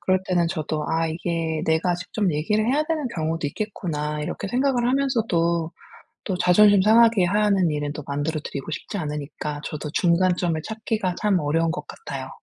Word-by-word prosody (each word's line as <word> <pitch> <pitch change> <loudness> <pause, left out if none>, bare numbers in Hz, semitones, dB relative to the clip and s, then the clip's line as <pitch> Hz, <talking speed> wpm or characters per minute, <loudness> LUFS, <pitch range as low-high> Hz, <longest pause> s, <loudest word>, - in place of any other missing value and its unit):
그럴 185 0 +2
때는 175 -2 +2
저도 155 -2 -3
'아. 165 0 +1
이게 160 -1 -2
내가 160 +3 +2
직접 185 +2 -2
얘기를 210 +9 0
해야 280 +5 +2
되는 310 -3 -1
경우도 160 -1 -1
있겠구나.' 150 -5 -3
이렇게 150 +5 -4
생각을 250 +1 +1
하면서도 220 -12 +1 0.5
또 190 - -2
자존심 200 +3 +6
상하게 225 -2 +5
하는 200 -2 +2
일은 145 -1 -2
또 150 - -7
만들어 145 +2 -2
드리고 145 0 -6
싶지 170 - -5
않으니까 150 -2 -4
저도 150 0 -5
중간점을 175 -2 +2
찾기가 215 -4 -2
참 205 -3 +2
어려운 160 +3 +1
것 160 -2 -4
같아요. 135 -2 -7
175 Hz, 375 characters per minute, -23 LUFS, 155-210 Hz, 0.5 s, 자존심